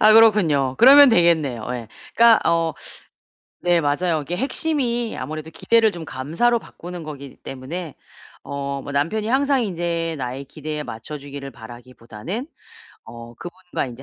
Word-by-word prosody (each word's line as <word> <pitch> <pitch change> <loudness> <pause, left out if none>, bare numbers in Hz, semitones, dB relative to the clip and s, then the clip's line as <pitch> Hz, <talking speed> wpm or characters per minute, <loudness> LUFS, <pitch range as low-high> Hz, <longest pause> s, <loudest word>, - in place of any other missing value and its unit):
아 215 0 +7
그렇군요. 175 -13 +4
그러면 280 +2 +9
되겠네요. 160 - +2
예. 120 -3 -6 0.3
그러니까 230 -1 +6
어 165 -2 +1 0.9
네 175 -1 +2
맞아요. 155 +1 0
이게 175 +5 -4
핵심이 250 - -1
아무래도 155 +1 -6
기대를 225 +5 +3
좀 170 -5 -8
감사로 170 - 0
바꾸는 175 0 -9
거기 140 -3 -9
때문에 145 +5 -7 0.5
어 140 0 -4
뭐 145 - -7
남편이 170 +10 -1
항상 270 +1 +2
인제 170 -3 -2
나의 130 0 -5
기대에 150 +1 -6
맞춰주기를 140 +3 -8
바라기보다는 120 - -8 0.6
어 120 0 -11
그분과 180 -4 -5
인제 125 +1 -10
160 Hz, 330 characters per minute, -22 LUFS, 140-215 Hz, 0.9 s, 그러면